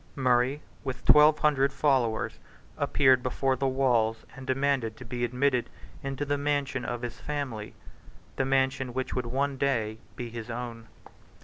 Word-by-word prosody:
Murray, 130 +2 +2 0.2
with 130 -2 -5
twelve 150 +1 +7
hundred 140 -3 +3
followers, 130 -6 +1 0.4
appeared 130 -2 +4
before 130 +1 0
the 135 +1 0
walls 120 -4 +1
and 135 -1 -10
demanded 130 -4 0
to - - -10
be 120 +1 -4
admitted 125 +1 +1 0.3
into 135 +1 -3
the 145 0 0
mansion 140 -2 -1
of 120 0 -4
his 120 - -5
family, 135 -8 -4 0.6
the - - +1
mansion 130 -1 +1
which 130 0 -2
would 125 -2 -2
one 135 +3 -1
day 115 -6 0 0.2
be 120 -1 -6
his 115 0 -7
own. 115 -1 -6
130 Hz, 150 wpm, -28 LUFS, 120-140 Hz, 0.6 s, twelve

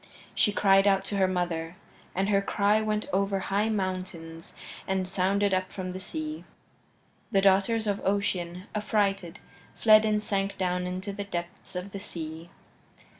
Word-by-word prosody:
She 210 - +3
cried 195 0 +4
out 195 -1 +3
to 205 - -2
her 190 -1 +4
mother, 175 -2 -2 0.4
and 195 +2 +1
her 200 -1 +3
cry 205 +2 +2
went 215 0 -1
over 195 0 +1
high 200 +3 0
mountains 185 -5 -4 0.3
and 190 -1 0
sounded 195 +2 +1
up 185 0 0
from 185 -1 -5
the 185 - -6
sea. 310 - -5 0.9
The 195 - +4
daughters 200 +3 +3
of 205 -1 -1
Ocean, 185 -3 -1
affrighted, 200 -4 0 0.4
fled 215 -1 +6
and 210 -1 +1
sank 195 -1 -1
down 180 -1 0
into 185 +3 -4
the 200 0 -4
depths 175 -2 -6
of 180 +2 -4
the 200 - -6
sea. 165 -3 -7
195 Hz, 155 wpm, -28 LUFS, 180-205 Hz, 0.9 s, fled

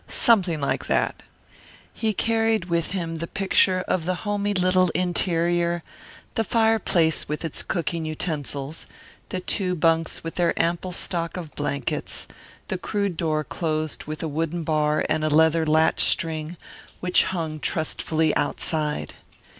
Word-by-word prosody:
Something 190 -9 +3
like 140 - -1
that. - - 0 0.7
He 220 -1 0
carried 225 -1 +1
with 170 -2 0
him 165 -4 -3
the 165 +1 -4
picture 190 -1 +3
of 170 -3 0
the 185 +1 0
homey 205 0 0
little 185 0 +4
ulterior, 175 -1 +1 0.5
the 225 - +1
fireplace 220 -10 +2
with 150 +2 -3
its 160 - -4
cooking 170 -1 -2
utensils, 155 -2 -4 0.4
the 185 - -2
two 180 -1 -1
bunks 165 0 +1
with 165 - -5
their 170 - +1
ample 170 +2 0
stock 170 -1 -3
of 165 -4 -7
blankets 145 -1 -2 0.4
the 185 - -3
crude 200 -2 -1
door 155 -2 0
closed 155 -1 -3
with 155 +1 -5
a - - -1
wooden 165 +3 -2
bar 150 -1 +1
and 155 0 0
a 155 - +2
leather 160 +1 +4
latch 160 +1 +3
string, 160 +1 0 0.4
which 180 0 +3
hung 160 -4 -3
trustfully 160 +1 0
outside. 150 +1 0
165 Hz, 140 wpm, -24 LUFS, 155-185 Hz, 0.7 s, little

